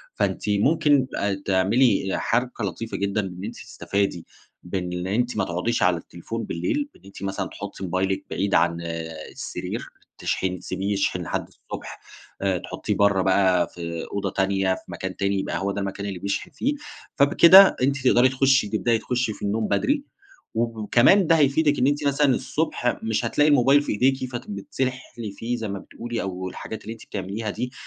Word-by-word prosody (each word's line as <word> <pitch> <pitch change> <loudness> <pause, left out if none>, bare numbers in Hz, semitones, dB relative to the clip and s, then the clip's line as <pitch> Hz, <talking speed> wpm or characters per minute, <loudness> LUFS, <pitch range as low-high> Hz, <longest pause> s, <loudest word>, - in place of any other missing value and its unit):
فأنتِ - - -1
ممكن 135 +5 +3
أ 100 0 0
تعملي 95 +2 +3
حركة 120 0 -1
لطيفة 110 +3 -4
جدًا 100 +1 0
إن 95 -2 -7
أنتِ - - -5
تستفادي 100 -4 -2 0.4
بإن 90 0 -3
أنتِ 120 +4 0
ما 105 - +2
تقعديش 90 +6 -1
على 90 -1 +3
التليفون 85 +7 -6
بالليل، 295 -2 -2
بإن - - -21
أنتِ 100 0 -11
مثلًا 95 0 -2
تحُطّي - - -8
موبايلِك 95 +1 -1
بعيد 100 +1 0
عن 85 +1 +2 0.5
السرير، - - -5 0.4
تشحن 90 -1 -1
تسيبيه 100 +2 -2
يشحن 100 - 0
لحد - - -3
الصبح. - - -9 0.4
آآ 95 -2 +1
تحُطّيه - - -4
برّه 100 -2 +3
بقى 95 -1 +3
في 85 -1 -6
أوضة 100 - -1
تانية، 95 -1 +1
في - - -11
مكان 95 +1 -5
تاني، 100 0 0
يبقى - - -2
هو 100 +1 -1
ده 100 - -3
المكان 100 +1 -4
اللي 95 -3 -4
بيشحن 100 +2 -3
فيه. 255 - -1 0.4
فبكده 170 +7 +8
أنتِ 135 +2 +2
تقدري 125 +1 +5
تخُشي 130 -3 +3
تبدئي 115 +2 +1
تخشي 125 -1 -1
في - - -15
النوم 105 +2 0
بدري 285 +1 +1 0.5
وكمان 120 - +3
ده 165 - +5
هيفيدِك 145 0 +3
إن 125 - +3
أنتِ 145 0 +1
مثلًا 140 -1 +3
الصبح 145 -5 -1
مش 110 +1 0
هتلاقي 145 +6 +3
الموبايل 140 0 +5
في - - -3
إيديكِ 130 +3 +1
فبتتسحلي 120 +1 -4
فيه 115 +4 -3
زي 115 -2 -4
ما 100 0 -4
بتقولي 120 +2 -5
أو 95 -1 -4
الحاجات 110 +4 -7
اللي 110 - -6
أنتِ 115 - -14
بتعمليها 100 +3 -4
دي 125 +5 -3
105 Hz, 170 wpm, -24 LUFS, 95-130 Hz, 0.5 s, فبكده